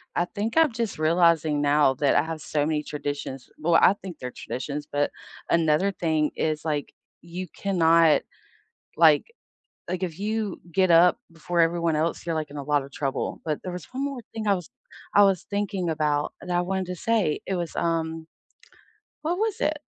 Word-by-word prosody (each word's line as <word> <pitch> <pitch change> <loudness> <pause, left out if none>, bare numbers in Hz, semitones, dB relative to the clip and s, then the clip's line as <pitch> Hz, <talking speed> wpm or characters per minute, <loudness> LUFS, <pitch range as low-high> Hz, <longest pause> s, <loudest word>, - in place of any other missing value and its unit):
I 175 - +2
think 215 - -4
I'm 320 -4 +5
just 225 -6 -3
realizing 160 -2 +3
now 145 -2 +3
that 140 +1 +2
I - - +5
have 160 -1 -5
so 145 0 -1
many 150 -1 0
traditions 145 -3 -5
well, 170 +1 +1
I 180 - +6
think 190 -4 -9
they're 125 0 -5
traditions, 145 +3 -5
but 145 0 0 0.4
another 165 +3 +3
thing 160 -5 0
is, 155 -1 -1
like, 150 -2 -2 0.3
you 175 +2 -6
cannot, 165 -4 +4 0.8
like - - +6 0.6
like, 185 0 -3
if 175 0 -6
you 215 -2 -2
get 185 +1 +3
up 175 +5 +6
before 170 +2 -3
everyone 165 -1 +2
else, 160 +2 -1
you're, 165 -2 -2
like, 155 -1 -2
in 145 - -9
a 145 - -4
lotta 145 -1 0
trouble. 135 0 -3
But 155 -2 -1
there 180 - -4
was 180 -1 -7
one 265 +2 -3
more 280 -3 -4
thing 220 -1 -5
I 200 - +4
was 180 -4 -6 0.4
I 205 - +7
was 195 -4 +1
thinking 200 -3 -1
about 150 -2 0
that 180 - -4
I - - +3
wanted 190 +1 -2
to 180 0 -5
say. 215 -5 +1
It 190 - -1
was, 175 -2 -3
um 165 -1 -1 1.0
What 330 +4 -1
was 435 0 -1
it? 305 0 +1
165 Hz, 185 wpm, -25 LUFS, 150-190 Hz, 1.0 s, I